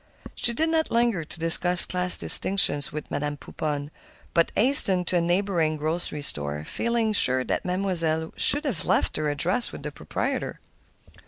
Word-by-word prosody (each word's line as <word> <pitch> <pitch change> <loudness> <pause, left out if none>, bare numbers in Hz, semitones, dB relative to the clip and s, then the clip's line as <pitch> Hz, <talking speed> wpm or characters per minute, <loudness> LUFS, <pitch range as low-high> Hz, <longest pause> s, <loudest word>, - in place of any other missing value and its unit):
She 240 - +1
did 320 +6 -2
not 320 -1 -2
linger 230 -7 -1
to 155 - -11
discuss 175 +2 +4
class 180 0 0
distinctions 185 -7 +5
with 150 0 -9
Madame 145 0 -5
Pouponne, 145 0 -7 0.4
but 170 -1 0
hastened 200 -7 +4
to 180 - 0
a - - 0
neighboring 175 -3 -2
grocery 155 -1 -3
store, 75 - -1
feeling 230 - -3
sure 130 -9 +2
that - - -5
Mademoiselle 170 -4 -1 0.2
would 295 - -6
have 230 - -3
left - - -2
her 150 - -3
address 180 - -1
with - - -12
the - - -7
proprietor. - - -6
175 Hz, 160 wpm, -23 LUFS, 150-200 Hz, 0.4 s, distinctions